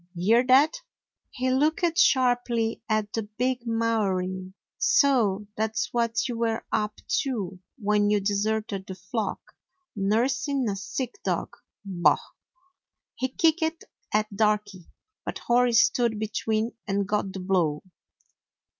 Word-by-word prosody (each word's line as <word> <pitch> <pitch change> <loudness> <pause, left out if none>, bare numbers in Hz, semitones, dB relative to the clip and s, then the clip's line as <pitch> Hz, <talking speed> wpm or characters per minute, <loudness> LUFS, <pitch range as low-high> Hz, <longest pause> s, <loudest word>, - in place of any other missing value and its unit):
Hear 220 +8 +3
that?" 290 - +5 0.5
He 255 0 -1
looked 315 +6 +2
sharply 245 - +2
at 215 -1 0
the 225 - 0
big 240 +3 -2
Maori. 190 -5 -1 0.3
"So 255 - +3
that 220 0 -1
's - - 0
what 235 0 +1
you 240 -2 -4
were 225 -1 -1
up 210 0 -1 0.2
to 205 - -4 0.2
when 210 -2 +2
you 210 0 +3
deserted 205 0 -1
the 190 - -6
flock; 190 +3 -3 0.6
nursing 245 +6 0
a 200 - -1
sick 245 - -5
dog. - - -2 0.3
Bah!" 180 -3 +3 1.0
He 260 - -2
kicked 320 +3 +1 0.3
at 215 0 0
Darky, 210 -4 0 0.4
but - - -4
Hori 245 0 +2
stood 230 0 +3
be 215 0 -3
tween 220 +1 -1 0.2
and 200 0 0
got 205 -1 -1
the 190 - -6
blow. 180 -5 0
220 Hz, 130 wpm, -26 LUFS, 200-250 Hz, 1.0 s, that